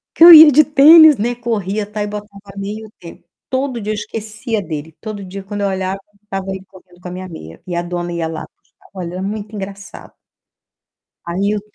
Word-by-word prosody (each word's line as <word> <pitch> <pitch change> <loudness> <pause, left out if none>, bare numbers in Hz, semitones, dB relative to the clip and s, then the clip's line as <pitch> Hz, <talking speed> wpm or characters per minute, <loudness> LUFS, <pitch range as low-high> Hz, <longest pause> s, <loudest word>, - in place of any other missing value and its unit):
Porque 330 - +7
eu 345 - +12
ia 310 -1 +10
de 300 +2 +5
tênis, 305 +1 +7
né, 235 +4 -1
corria, 215 -4 -3
tal, 210 0 -5
e - - -2
botava 210 0 -7 0.3
meia 200 +2 -5
e - - -10
o - - -18
tênis. 170 -2 -13 0.3
Todo 260 -2 -2
dia 210 0 -3
eu - - -2
esquecia 215 +2 -5
dele. 155 -3 -7
Todo 215 -3 -7
dia, 195 +1 -8
quando 205 +1 -6
eu 200 - +1
olhava, 190 0 -3 0.2
estava 195 -2 -5
aí 190 0 -6
correndo 185 -2 -20
com 180 - -9
a - - -7
minha 185 +1 -7
meia. 80 - -11
E 180 - -5
a 170 - -1
dona 175 0 -5
ia 170 -1 -3
lá 160 - -6 0.2
buscar. - - -27
Olha, 180 -1 -6
é - - -5
muito 210 +2 -5
engraçado. 195 -1 -9 1.1
Aí 190 +4 -1
eu 210 - -3
200 Hz, 220 wpm, -17 LUFS, 185-220 Hz, 1.1 s, eu